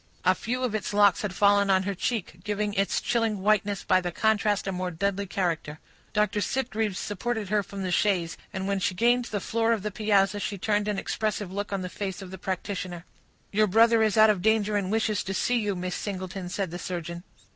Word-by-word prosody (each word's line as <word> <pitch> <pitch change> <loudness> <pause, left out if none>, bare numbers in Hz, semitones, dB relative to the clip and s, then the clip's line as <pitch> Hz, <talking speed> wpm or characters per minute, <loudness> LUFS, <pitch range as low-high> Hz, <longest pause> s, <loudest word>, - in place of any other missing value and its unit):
A 185 - +6
few 250 +6 -3
of 245 -4 0
its 215 -1 -2
locks 205 -2 +5
had 200 -3 -3
fallen 200 0 +4
on 190 -1 +4
her 200 +1 -2
cheek, 190 -3 -3
giving 210 0 -1
its 195 0 +1
chilling 225 -3 0
whiteness 205 -1 +2
by 185 - +3
the 175 -1 -3
contrast 210 +1 +1
a 195 - -1
more 185 0 -2
deadly 200 +3 -1
character. 165 -5 -2 0.3
Dr. 210 -1 +1
Sitgreaves 225 -6 -1
supported 215 0 -3
her 210 0 +2
from 195 0 -7
the 185 - -2
chaise; 175 -3 +1 0.2
and 190 0 -4
when 200 -1 0
she 185 0 0
gained 240 +4 +3
the 210 - -3
floor 230 +3 +1
of 215 -4 -2
the 210 - -2
piazza, 205 -1 +2
she 200 0 -3
turned 210 +2 0
an 210 -1 -1
expressive 210 -2 -2
look 205 +1 -3
on 195 -2 -2
the - - -3
face 190 0 -5
of 185 - -10
the 190 - -8
practitioner. 185 -2 -4 0.5
"Your 215 +1 +3
brother 225 +3 +5
is 220 -1 +2
out 215 0 +8
of 195 -4 -2
danger 215 0 +2
and 200 -2 0
wishes 220 -2 +1
to 195 - -4
see 245 +4 +1
you, 205 -3 -1
Miss 180 0 -3
Singleton," 185 -2 -5
said 190 -2 -2
the 175 - -5
surgeon. 170 -1 -5
200 Hz, 220 wpm, -27 LUFS, 185-215 Hz, 0.5 s, out